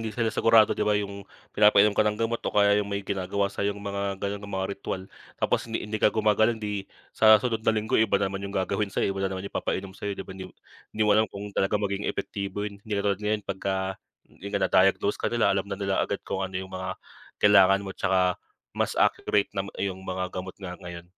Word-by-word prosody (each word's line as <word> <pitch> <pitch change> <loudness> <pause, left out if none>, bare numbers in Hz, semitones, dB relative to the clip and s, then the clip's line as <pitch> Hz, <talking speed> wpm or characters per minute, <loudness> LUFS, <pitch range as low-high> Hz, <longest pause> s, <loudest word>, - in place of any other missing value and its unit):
hindi 115 - -3
sila 115 0 -1
sigurado 115 -1 +5
di - - -5
ba, 105 -1 +2
'yung 100 -1 -4 0.3
pinapainom 105 0 +5
ka - - +1
ng 105 0 +2
gamot 115 +1 -1
o - - -3
kaya 100 0 +5
'yung 100 - -4
may 100 -1 -3
ginagawa 100 +1 -1
sa'yo 100 0 -1
'yung 100 - -10
mga 100 0 -2
gano'n 100 +1 -3
mga 95 -1 -3
ritwal, 95 -1 -5 0.3
tapos - - 0
hindi 115 - -3
hindi 105 0 -4
ka - - +6
gumagaling, 110 +1 +2
di 105 -2 -4 0.2
sa 110 -1 +7
susunod 115 0 -1
na 110 0 +1
linggo, 110 0 +1
iba 110 -2 +3
naman 95 0 -2
'yung 100 0 -5
gagawin 100 +2 0
sa'yo, 100 0 0
iba 95 - -5
na 95 - +1
naman 95 - -6
yung 100 - -7
ipapainom 95 0 -3
sa'yo 100 0 -5
di - - -6
ba, - - -9
'yung 95 -1 -9 0.4
di 110 - +2
mo 105 - +4
alam 110 +1 +3
kung 100 +1 -8
talagang 100 +2 0
maging 100 +1 -2
epektibo 100 0 -4
'yun. 100 -1 -7
Hindi 110 0 -8
katulad 100 0 0
ngayon, 105 0 -1
'pagka 95 0 -2 0.6
'yun 100 - -9
nga, - - 0
na-diagnose 95 +2 +3
ka - - 0
nila 120 -1 +2
alam 100 0 -1
na 100 - -3
nila 100 -1 0
agad 100 - -2
kung 95 - -3
ano 95 -1 -3
'yung 95 0 -6
mga 95 0 -4 0.4
kailangan 100 -1 +5
mo, 95 - -5
tsaka 90 -1 +1 0.3
mas - - -1
accurate 100 -1 +2
na 100 -1 -3
iyong 95 -1 -3
mga 95 -1 -3
gamot 95 0 -6
nga 95 -3 -7
ngayon. 85 -1 -8
100 Hz, 230 wpm, -26 LUFS, 95-105 Hz, 0.6 s, sa